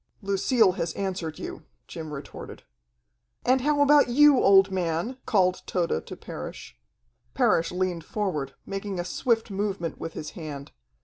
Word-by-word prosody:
"Lucille 200 Hz, +2 st, +3 dB
has 170 Hz, -2 st, -3 dB
answered 185 Hz, -5 st, -3 dB
you," -, -, -7 dB, 0.3 s
Jim 160 Hz, -2 st, -7 dB
retorted. 140 Hz, -1 st, -9 dB, 0.8 s
"And 260 Hz, +1 st, +3 dB
how 290 Hz, +1 st, +2 dB
about 290 Hz, -2 st, +5 dB
you, 285 Hz, +1 st, +6 dB
old 195 Hz, 0 st, +6 dB
man?" 180 Hz, +7 st, -2 dB
called 185 Hz, -4 st, +2 dB
Tode 170 Hz, -, -1 dB
to -, -, -7 dB
Parrish. -, -, -8 dB, 0.6 s
Parrish 215 Hz, -9 st, +2 dB
leased 180 Hz, -1 st, -1 dB
forward, 155 Hz, -10 st, -2 dB
making 195 Hz, -1 st, -4 dB
a 175 Hz, -, -2 dB
swift 225 Hz, +2 st, 0 dB
movement 195 Hz, -5 st, -3 dB
with 165 Hz, -, -5 dB
his 150 Hz, -, -6 dB
hand. 145 Hz, -5 st, -8 dB
190 Hz, 140 wpm, -26 LUFS, 165-225 Hz, 0.8 s, you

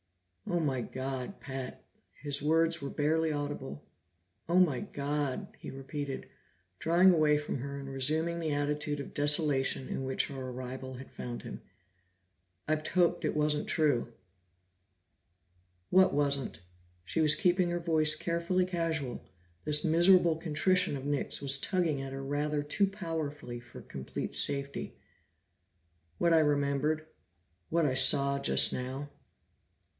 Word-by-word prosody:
"Oh 175 Hz, -, 0 dB
my 135 Hz, -6 st, 0 dB
God, 130 Hz, -, -5 dB
Pat!" 130 Hz, -2 st, -7 dB, 0.4 s
His 145 Hz, -1 st, -1 dB
words 165 Hz, +2 st, +2 dB
were 140 Hz, -, -4 dB
barely 160 Hz, +2 st, +1 dB
audible. 145 Hz, -, -5 dB, 0.6 s
"Oh 175 Hz, -, +3 dB
my 155 Hz, -9 st, +3 dB
God!" 145 Hz, -1 st, -3 dB
he -, -, -8 dB
repeated, 135 Hz, +1 st, -6 dB, 0.5 s
drawing 175 Hz, +3 st, +5 dB
away 155 Hz, -2 st, +3 dB
from 150 Hz, -2 st, -4 dB
her 140 Hz, +2 st, -5 dB
and 135 Hz, -, -8 dB
resuming 155 Hz, +6 st, 0 dB
the 160 Hz, -2 st, -2 dB
attitude 145 Hz, 0 st, -1 dB
of 140 Hz, -, -7 dB
desolation 145 Hz, -3 st, +1 dB
in -, -, -4 dB
which 130 Hz, 0 st, 0 dB
her 130 Hz, -2 st, -6 dB
arrival 130 Hz, +1 st, -7 dB
had 130 Hz, +1 st, -11 dB
found 120 Hz, -1 st, -7 dB
him. -, -, -8 dB, 1.1 s
"I've 155 Hz, 0 st, 0 dB
hoped 175 Hz, 0 st, +1 dB
it -, -, -1 dB
wasn't 150 Hz, 0 st, +1 dB
true!" 140 Hz, -7 st, +1 dB, 1.8 s
"What 185 Hz, -2 st, +5 dB
wasn't?" 140 Hz, -, 0 dB, 0.4 s
She 160 Hz, -, -1 dB
was 155 Hz, -1 st, +5 dB
keeping 180 Hz, 0 st, +2 dB
her 175 Hz, 0 st, -1 dB
voice 155 Hz, -3 st, +4 dB
carefully 170 Hz, +3 st, 0 dB
casual; 165 Hz, -8 st, -3 dB, 0.4 s
this 150 Hz, +1 st, +2 dB
miserable 170 Hz, +1 st, +5 dB
contrition 165 Hz, +1 st, +1 dB
of 135 Hz, -, -8 dB
Nick's 145 Hz, -1 st, -1 dB
was 135 Hz, -1 st, +5 dB
tugging 170 Hz, -6 st, 0 dB
at 135 Hz, 0 st, -6 dB
her 135 Hz, 0 st, -6 dB
rather 145 Hz, +1 st, -1 dB
too 195 Hz, +7 st, +1 dB
powerfully 160 Hz, -, -5 dB
for 120 Hz, 0 st, -12 dB
complete 65 Hz, -1 st, -6 dB
safety. 140 Hz, 0 st, -2 dB, 1.2 s
"What 170 Hz, -1 st, +3 dB
I 165 Hz, -, +6 dB
remembered. 150 Hz, +1 st, +1 dB, 0.6 s
What 165 Hz, 0 st, +2 dB
I 135 Hz, -, +1 dB
saw 140 Hz, +2 st, +5 dB
just -, -, +5 dB
now." 130 Hz, +3 st, -4 dB
150 Hz, 135 wpm, -31 LUFS, 135-165 Hz, 1.8 s, I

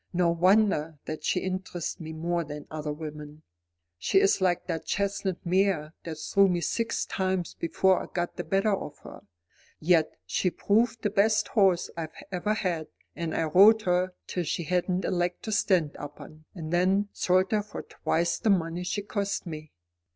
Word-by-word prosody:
"No 175 Hz, -1 st, +3 dB
wonder 175 Hz, -3 st, +3 dB
that 155 Hz, -, -5 dB
she 180 Hz, -, +1 dB
interests 185 Hz, -2 st, -4 dB
me 160 Hz, -2 st, -7 dB
more 170 Hz, +2 st, -1 dB
than 150 Hz, -1 st, -8 dB
other 155 Hz, -1 st, -3 dB
women. 150 Hz, 0 st, -8 dB, 0.6 s
She 145 Hz, -, +3 dB
is 195 Hz, -, +3 dB
like 180 Hz, -2 st, +1 dB
that 165 Hz, -3 st, -3 dB
chestnut 200 Hz, -3 st, -2 dB
mare 180 Hz, -4 st, +1 dB
that 165 Hz, -2 st, -4 dB
threw 195 Hz, +6 st, +3 dB
me 180 Hz, -2 st, +1 dB
six 230 Hz, +6 st, -1 dB
times 185 Hz, -2 st, -1 dB
before 185 Hz, +3 st, +2 dB
I -, -, -7 dB
got 175 Hz, -1 st, -2 dB
the -, -, -4 dB
better 195 Hz, +2 st, +1 dB
of 150 Hz, -6 st, -4 dB
her. -, -, -11 dB, 0.6 s
Yet 160 Hz, -1 st, +3 dB
she 185 Hz, -, 0 dB
proved 225 Hz, +5 st, +1 dB
the 210 Hz, -, +1 dB
best 215 Hz, +1 st, +2 dB
horse 190 Hz, -4 st, +3 dB
I 165 Hz, -1 st, -3 dB, 0.2 s
ever 200 Hz, +4 st, 0 dB
had, 175 Hz, -7 st, -2 dB, 0.3 s
and 165 Hz, -2 st, -3 dB
I -, -, +1 dB
rode 205 Hz, +7 st, +6 dB
her 180 Hz, 0 st, +1 dB
till 180 Hz, -, -2 dB
she 165 Hz, +2 st, -2 dB
hadn't 180 Hz, +2 st, 0 dB
a -, -, 0 dB
leg 175 Hz, 0 st, 0 dB
to 220 Hz, -, -4 dB
stand 180 Hz, -7 st, +2 dB
upon, 150 Hz, +2 st, -10 dB
and 165 Hz, -2 st, -5 dB
then 190 Hz, +3 st, +2 dB
sold 185 Hz, +1 st, +2 dB
her 215 Hz, -1 st, +2 dB
for 210 Hz, -, -8 dB
twice 170 Hz, +1 st, -1 dB
the 225 Hz, -, +1 dB
money 175 Hz, -2 st, +1 dB
she 200 Hz, +3 st, -2 dB
cost 200 Hz, -1 st, -2 dB
me. 155 Hz, -3 st, -7 dB
180 Hz, 180 wpm, -28 LUFS, 160-195 Hz, 0.6 s, rode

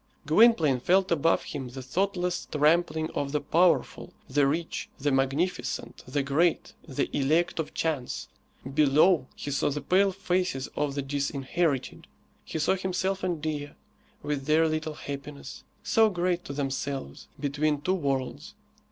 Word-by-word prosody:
Gwynplaine 160 Hz, -, +5 dB
felt 185 Hz, +8 st, +2 dB
above 165 Hz, 0 st, +2 dB
him 135 Hz, -4 st, -5 dB
the 130 Hz, +1 st, -8 dB
thoughtless 180 Hz, +5 st, -1 dB
trampling 155 Hz, +1 st, +2 dB
of 140 Hz, 0 st, -3 dB
the 150 Hz, -, +2 dB
powerful, 170 Hz, +4 st, +1 dB, 0.2 s
the 140 Hz, +1 st, +3 dB
rich, 160 Hz, +4 st, -2 dB
the 145 Hz, 0 st, 0 dB
magnificent, 135 Hz, +7 st, -1 dB
the 140 Hz, +2 st, -1 dB
great, 155 Hz, +5 st, +1 dB
the 135 Hz, -, -1 dB
elect 155 Hz, +5 st, +1 dB
of 160 Hz, -, -4 dB
chance. 150 Hz, -6 st, -2 dB, 0.5 s
Below 150 Hz, +1 st, +4 dB
he 145 Hz, -, -5 dB
saw 140 Hz, -, +1 dB
the 145 Hz, +1 st, -2 dB
pale 195 Hz, +5 st, +3 dB
faces 180 Hz, -7 st, -1 dB
of 145 Hz, -2 st, -1 dB
the 140 Hz, -, -2 dB
disinherited. 140 Hz, +1 st, -2 dB, 0.4 s
He -, -, -5 dB
saw 155 Hz, +4 st, +2 dB
himself 190 Hz, +1 st, -2 dB
and 175 Hz, -4 st, -2 dB
Dea, 150 Hz, -2 st, -3 dB, 0.5 s
with 145 Hz, -2 st, -2 dB
their 160 Hz, +1 st, +4 dB
little 155 Hz, -1 st, -2 dB
happiness, 140 Hz, -1 st, -8 dB, 0.2 s
so 225 Hz, -1 st, +4 dB
great 175 Hz, -2 st, -1 dB
to 140 Hz, -, -6 dB
themselves, 135 Hz, -, -4 dB
between 145 Hz, +1 st, 0 dB
two 185 Hz, -, +1 dB
worlds. 135 Hz, -7 st, -2 dB
150 Hz, 145 wpm, -27 LUFS, 140-175 Hz, 0.5 s, Gwynplaine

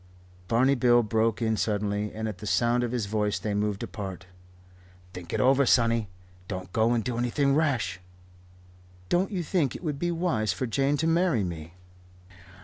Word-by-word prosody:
Barney 125 Hz, +6 st, +3 dB
Bill 120 Hz, -2 st, +4 dB
broke 110 Hz, +1 st, 0 dB
in 110 Hz, -1 st, +1 dB
suddenly; 105 Hz, -1 st, -1 dB
and 110 Hz, +1 st, -4 dB
at 105 Hz, -4 st, -6 dB
the 105 Hz, -, -7 dB
sound 120 Hz, +3 st, +2 dB
of 120 Hz, -, -2 dB
his 120 Hz, -4 st, -1 dB
voice 105 Hz, 0 st, 0 dB
they 105 Hz, -, -3 dB
moved 105 Hz, -1 st, -1 dB
apart. 95 Hz, -3 st, -6 dB, 0.9 s
"Think 90 Hz, -1 st, -9 dB
over 135 Hz, +2 st, +4 dB
it, 135 Hz, -, +2 dB
sonny. 115 Hz, -4 st, +3 dB, 0.4 s
Don't 95 Hz, -2 st, -6 dB
go 115 Hz, +1 st, +3 dB
and 115 Hz, -2 st, 0 dB
do 120 Hz, 0 st, -3 dB
anything 135 Hz, +3 st, +1 dB
rash." 135 Hz, -, 0 dB, 1.1 s
"Don't 185 Hz, +2 st, +2 dB
you 185 Hz, -4 st, -3 dB
think 155 Hz, -5 st, 0 dB
it -, -, -8 dB
would 150 Hz, -4 st, -3 dB
be 175 Hz, -, 0 dB
wise 165 Hz, -, 0 dB
for 90 Hz, -, -3 dB
Jane 135 Hz, +4 st, +1 dB
to 160 Hz, -, -1 dB
marry 165 Hz, -, +2 dB
me?" 85 Hz, -2 st, -6 dB
115 Hz, 175 wpm, -27 LUFS, 105-135 Hz, 1.1 s, Bill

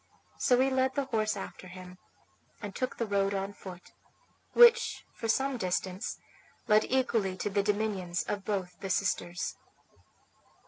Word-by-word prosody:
So 250 Hz, -2 st, +4 dB
he 265 Hz, +1 st, +3 dB
led 260 Hz, 0 st, +1 dB
the 280 Hz, -1 st, 0 dB
horse 215 Hz, -4 st, 0 dB
after 190 Hz, -1 st, -8 dB
him, 180 Hz, 0 st, -11 dB, 0.6 s
and 205 Hz, -3 st, -6 dB
took 255 Hz, +4 st, -3 dB
the 230 Hz, -, 0 dB
road 200 Hz, -1 st, +1 dB
on 195 Hz, +1 st, -3 dB
foot, 185 Hz, -3 st, -11 dB, 0.6 s
which 475 Hz, -1 st, +6 dB
for 225 Hz, -, -5 dB
some 265 Hz, +3 st, +1 dB
distance 185 Hz, -1 st, -2 dB, 0.5 s
led 215 Hz, 0 st, +5 dB
equally 225 Hz, -7 st, +1 dB
to 205 Hz, -, -2 dB
the 200 Hz, +1 st, +2 dB
dominions 200 Hz, -4 st, -1 dB
of 205 Hz, -1 st, -3 dB
both 190 Hz, -3 st, -3 dB
the 195 Hz, -, -5 dB
sisters. 185 Hz, -2 st, -1 dB
205 Hz, 145 wpm, -30 LUFS, 185-245 Hz, 0.6 s, which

